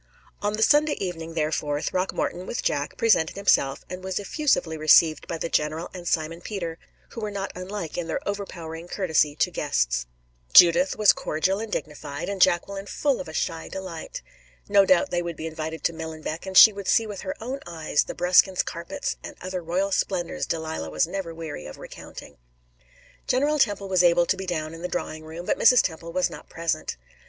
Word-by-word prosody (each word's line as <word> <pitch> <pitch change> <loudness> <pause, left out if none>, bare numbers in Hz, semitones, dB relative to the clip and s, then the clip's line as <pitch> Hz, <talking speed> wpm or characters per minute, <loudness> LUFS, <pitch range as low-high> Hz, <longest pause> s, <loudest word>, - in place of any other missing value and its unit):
On 205 0 0
the 220 +1 +1
Sunday 295 +3 +4
evening, 165 -3 -5
therefore, 150 -2 -1
Throckmorton, 185 +1 -2
with - - -3
Jack, 145 0 -1
presented 200 -8 +3
himself, 160 -9 +2
and 185 0 -7
was 190 0 -3
effusively 205 - 0
received 155 +1 +4
by 165 - -3
the 165 - -3
general 155 +1 -1
and 175 -2 -8
Simon 165 +1 -1
Peter, 170 -6 -5 0.3
who 230 - -8
were 215 - -2
not 200 -1 -4
unlike 185 -2 -5
in 170 - -4
their 165 - -2
overpowering 170 -5 -5
courtesy 160 -6 +1
to - - +1
guests. - - 0 0.5
Judith 260 +12 +7
was 210 -1 +6
cordial 185 +6 -1
and 220 -1 -5
dignified, 150 0 -5
and 200 -2 -4
Jacqueline 195 +4 +2
full 275 +3 0
of 185 - -8
a 160 - -8
shy 165 0 -2
delight. 185 -4 -7 0.4
No 200 -1 +5
doubt 280 +5 +3
they 175 - +1
would 170 -1 -4
be 160 - -6
invited 160 0 -5
to 170 - +1
Millenbeck, 160 +1 -6
and 190 -1 0
she 220 - +10
would 200 -1 -7
see 225 - +4
with 205 -3 -6
her 190 - -4
own 255 +5 -4
eyes 160 -3 0
the - - -6
Bruskins 180 +1 +4
carpets 170 0 -4
and - - -8
other 185 0 -4
royal 180 +4 -1
splendors 180 -3 -1
Delilah 160 - -3
was 75 0 +1
never 190 -4 -5
weary 160 - -7
of - - -10
recounting. 70 - -11 0.9
General 290 +4 +2
Temple 205 -5 +1
was 185 -2 +3
able 175 0 +5
to 190 - +1
be 190 0 -7
down 155 -3 -3
in 165 - -9
the 180 - -2
drawing 155 -3 -4
room, 160 +2 -8
but - - 0
Mrs. 250 +1 +6
Temple 165 0 -4
was 185 +1 +1
not - - -11
present. 165 - -2
175 Hz, 195 wpm, -25 LUFS, 160-195 Hz, 0.9 s, she